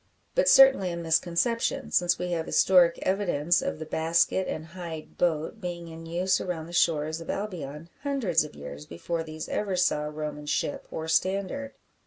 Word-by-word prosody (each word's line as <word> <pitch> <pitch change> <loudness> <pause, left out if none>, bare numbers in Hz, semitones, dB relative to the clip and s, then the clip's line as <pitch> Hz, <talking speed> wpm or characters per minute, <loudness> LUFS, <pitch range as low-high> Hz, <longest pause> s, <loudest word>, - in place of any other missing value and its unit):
But - - +3
certainly 270 -9 +7
a 170 - -4
misconception; 170 +7 0
since 175 -1 +3
we 180 0 -3
have 165 -1 -2
historic 175 -3 +5
evidence 175 -4 +1
of 275 +1 -3
the 160 - -6
basket 165 +4 +1
and 155 - -4
hide 165 -2 -8
boat 165 +5 -1
being 175 -2 -5
in 165 0 -9
use 180 +3 +1
around 170 -3 -4
the 170 - -11
shores 160 -2 +1
of 165 - -10
Albion 165 -7 -5
hundreds 260 - +1
of 150 - -10
years 70 0 -9
before 165 - -4
these 155 -1 -7
ever 200 -3 -1
saw 175 -4 +1
Roman 150 -1 -5
ship 145 - -2
or 160 - -5
standard. 195 +11 -1
170 Hz, 170 wpm, -27 LUFS, 160-185 Hz, -, certainly